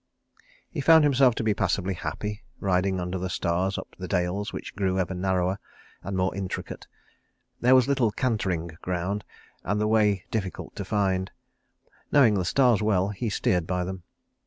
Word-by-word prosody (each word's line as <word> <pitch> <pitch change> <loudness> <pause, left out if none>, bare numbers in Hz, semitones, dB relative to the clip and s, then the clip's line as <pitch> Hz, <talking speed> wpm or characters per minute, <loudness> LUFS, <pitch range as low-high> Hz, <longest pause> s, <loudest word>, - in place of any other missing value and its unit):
He 155 - -4
found 160 +2 +7
himself 135 -4 +4
to - - -2
be 110 -1 +2
passably 95 -1 0
happy, 105 +4 -5 0.2
riding 95 0 +1
under 90 +1 -3
the 95 +1 -3
stars 90 +3 0
up - - -8
the 90 - -5
dales 90 +2 -1
which - - -7
grew 95 -2 0
ever 95 0 -1
narrower, 95 +1 0 0.4
and 95 -1 -4
more 95 +1 +1
intricate. 95 -2 -5 0.7
There 125 +2 +5
was 130 -1 +5
little 135 -5 +2
cantering 95 -9 -1
ground, 90 +3 -2 0.4
and 105 +3 -1
the 105 - +1
way 105 -4 +2
difficult 95 -5 -4
to - - -4
find. 95 -2 0 0.8
Knowing 130 -7 +6
the 95 -3 0
stars 125 +1 +3
well, 100 -3 +2
he 105 +3 -3
steered 90 -4 0
by 90 0 -1
them. 95 +1 -5
95 Hz, 165 wpm, -26 LUFS, 90-110 Hz, 0.8 s, found